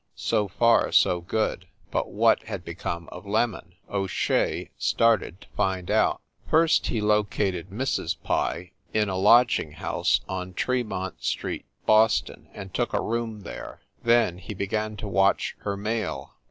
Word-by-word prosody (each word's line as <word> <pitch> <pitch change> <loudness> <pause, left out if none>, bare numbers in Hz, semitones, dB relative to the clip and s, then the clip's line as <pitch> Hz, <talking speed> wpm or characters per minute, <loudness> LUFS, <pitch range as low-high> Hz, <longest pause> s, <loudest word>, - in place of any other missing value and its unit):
So 105 -1 0
far, 115 +5 +3
so 90 -1 +4
good; 110 +5 -2 0.2
but - - -1
what - - +3
had - - -6
become 85 -1 -5
of 105 - -10
"Lemon?" 105 -3 -1
O 100 -1 -2
Shea - - 0
started 115 -5 +1
to - - -15
find 95 -2 -1
out. - - +2 0.3
First 160 0 +4
he 115 - -1
located 105 -3 0
Mrs. 125 +8 -1
Pye 90 +1 -1 0.2
in 105 -2 +2
a 95 - -2
lodging 115 -5 +4
house 80 - 0
on 90 -1 -5
Tremont 110 -8 -2
street, - - -2 0.2
Boston, 110 -1 +3
and 95 -2 -8
took 120 - -1
a - - +2
room 115 -2 -3
there. - - -8 0.2
Then 115 -7 +3
he 100 +3 -7
began 105 +2 -2
to 105 +1 -5
watch 95 0 +2
her 100 -1 -3
mail. 105 - -3
105 Hz, 150 wpm, -26 LUFS, 95-115 Hz, 0.3 s, so